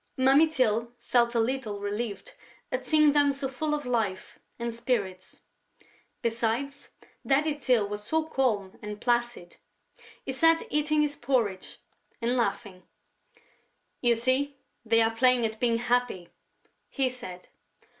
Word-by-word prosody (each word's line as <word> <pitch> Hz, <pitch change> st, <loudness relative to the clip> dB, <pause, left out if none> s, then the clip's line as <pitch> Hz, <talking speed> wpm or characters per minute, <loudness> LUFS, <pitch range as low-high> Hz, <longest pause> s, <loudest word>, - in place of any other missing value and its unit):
Mummy 270 Hz, +4 st, +5 dB
Tyl 235 Hz, -5 st, 0 dB
felt 240 Hz, -1 st, +1 dB
a -, -, +3 dB
little 225 Hz, -3 st, -1 dB
relieved 210 Hz, -, -4 dB, 0.4 s
at -, -, -3 dB
seeing 305 Hz, -2 st, +5 dB
them 285 Hz, -1 st, +4 dB
so 275 Hz, 0 st, -3 dB
full 300 Hz, +3 st, -2 dB
of 295 Hz, -2 st, -5 dB
life 220 Hz, -6 st, -2 dB, 0.2 s
and 235 Hz, -1 st, -3 dB
spirits. 210 Hz, -6 st, -3 dB, 0.8 s
Besides, 235 Hz, +5 st, -2 dB, 0.3 s
Daddy 290 Hz, +3 st, +2 dB
Tyl 245 Hz, -7 st, +1 dB
was 205 Hz, 0 st, -5 dB
so 315 Hz, +8 st, 0 dB
calm 220 Hz, -10 st, -1 dB
and 210 Hz, 0 st, -7 dB
placid. 240 Hz, -7 st, -1 dB, 0.7 s
He -, -, -2 dB
sat 325 Hz, +4 st, +4 dB
eating 300 Hz, +1 st, +2 dB
his 290 Hz, -1 st, -2 dB
porridge 235 Hz, -8 st, -1 dB, 0.4 s
and 240 Hz, +1 st, 0 dB
laughing: 205 Hz, -6 st, -2 dB, 1.2 s
"You 240 Hz, -1 st, +4 dB
see, 260 Hz, +4 st, +1 dB, 0.3 s
they 230 Hz, 0 st, +4 dB
are 225 Hz, 0 st, 0 dB
playing 250 Hz, 0 st, +4 dB
at 220 Hz, 0 st, -4 dB
being 235 Hz, -2 st, +2 dB
happy!" 240 Hz, -6 st, -1 dB, 0.6 s
he 270 Hz, -1 st, 0 dB
said. 210 Hz, -8 st, -8 dB
240 Hz, 135 wpm, -27 LUFS, 225-275 Hz, 1.2 s, Mummy